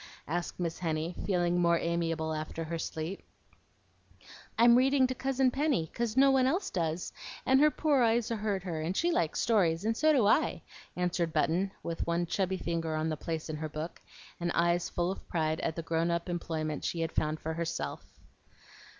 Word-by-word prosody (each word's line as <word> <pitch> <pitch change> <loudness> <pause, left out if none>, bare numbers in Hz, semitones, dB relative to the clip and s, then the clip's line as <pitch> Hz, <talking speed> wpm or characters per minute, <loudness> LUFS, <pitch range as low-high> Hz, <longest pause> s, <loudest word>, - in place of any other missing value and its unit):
asked 175 +3 -3
Miss 170 -2 -2
Henny, 160 0 -2
feeling 175 -2 +2
more 170 -1 +4
amiable 165 -2 -1
after 155 +1 -4
her 165 +1 -4
sleep. 160 +4 -4 1.4
"I'm 235 +1 +7
reading 265 +1 +4
to 255 - -1
Cousin 265 0 +1
Penny, 270 - 0
'cause 235 0 -2
no 275 +1 +6
one 260 -1 +4
else 355 +9 0
does, 165 -1 -2 0.3
and 265 +1 +5
her 300 +1 +6
poor 295 -3 +2
eyes 230 0 +2
hurt 210 -4 -1
her, 165 -4 -3
and 170 +4 -2
she 345 +1 +2
likes 165 - 0
stories, 190 -6 +2
and 225 +1 +1
so 310 +6 +4
do 260 -8 +4
I," 255 +9 +2 0.3
answered 175 -2 -1
Button, 180 +4 +1
with 165 0 -3
one 170 +1 +1
chubby 190 +2 -1
finger 165 -2 -2
on 155 +1 0
the 155 - -1
place 160 +1 -4
in 155 -1 -4
her 155 0 -4
book, 155 +2 -6 0.4
and 175 0 -1
eyes 170 +1 +2
full 175 +1 -1
of 195 - -9
pride 155 -2 0
at 160 - -2
the 165 - -4
grown 165 +1 0
up 170 +1 -1
employment 160 -3 -3
she 170 - -2
had 165 - -1
found 155 0 -1
for 160 - -3
herself. 165 0 -3
175 Hz, 190 wpm, -30 LUFS, 160-225 Hz, 1.4 s, I'm